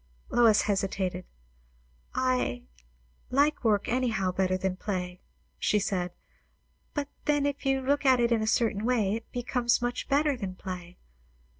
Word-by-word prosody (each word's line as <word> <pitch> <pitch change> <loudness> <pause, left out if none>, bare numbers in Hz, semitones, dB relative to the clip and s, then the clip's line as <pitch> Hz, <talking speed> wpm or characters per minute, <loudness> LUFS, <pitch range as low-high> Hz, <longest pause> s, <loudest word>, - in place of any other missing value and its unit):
Lois 230 -3 +5
hesitated. 190 -3 -1 0.9
"I 255 - 0 0.7
like 285 +3 +2
work 210 -3 +2
anyhow 225 -7 0
better 185 0 +1
than 190 0 -1
play," 180 -2 -4 0.4
she 210 - +2
said. 185 -3 -1 0.8
"But 290 -2 -1 0.2
then, 290 -2 +2
if 285 -1 -2
you 270 0 +2
look 280 +3 +1
at 260 -2 +5
it 235 0 +2
in 230 -2 +3
a 220 - -1
certain 215 -2 +1
way, 225 -5 +2
it 225 +1 -6
becomes 245 -1 +1
much 245 0 -3
better 290 0 +3
than 195 -6 -5
play. 180 -2 -7
225 Hz, 145 wpm, -28 LUFS, 190-255 Hz, 0.9 s, Lois